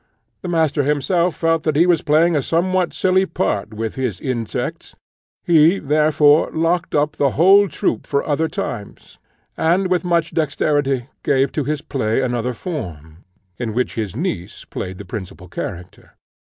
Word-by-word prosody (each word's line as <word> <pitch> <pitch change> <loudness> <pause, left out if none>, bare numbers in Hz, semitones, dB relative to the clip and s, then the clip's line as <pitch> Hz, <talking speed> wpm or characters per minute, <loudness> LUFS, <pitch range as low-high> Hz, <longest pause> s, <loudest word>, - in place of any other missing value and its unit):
The - - -6
master 160 -4 +1
himself 160 +5 +1
felt 165 -1 +1
that 155 -1 -1
he 165 +4 +5
was 175 -3 +3
playing 160 +3 +3
a 145 - +2
somewhat 180 +5 0
silly 185 +1 +2
part 105 - -2
with 110 0 -3
his 125 -8 -3
insects; 120 -4 -4 0.5
he, 165 +2 +5
therefore, 150 -1 +3
locked 165 +2 0
up 150 0 +2
the 140 - +3
whole 195 +5 +6
troop 140 - -2
for 140 - -1
other 155 +2 +1
times, 110 -8 -6 0.4
and 180 +4 +1
with 180 0 +2
much 170 -2 +1
dexterity 140 -4 0
gave 135 0 +1
to 150 - -2
his 150 -1 -2
play 110 -4 -1
another 125 -1 -1
form, 85 - -7 0.4
in 115 -3 -3
which 125 +1 0
his 105 -4 -4
niece 115 - -4
played 90 0 -6
the 105 - -9
principal 95 -1 -8
character. 90 0 -8
145 Hz, 155 wpm, -20 LUFS, 120-165 Hz, 0.5 s, whole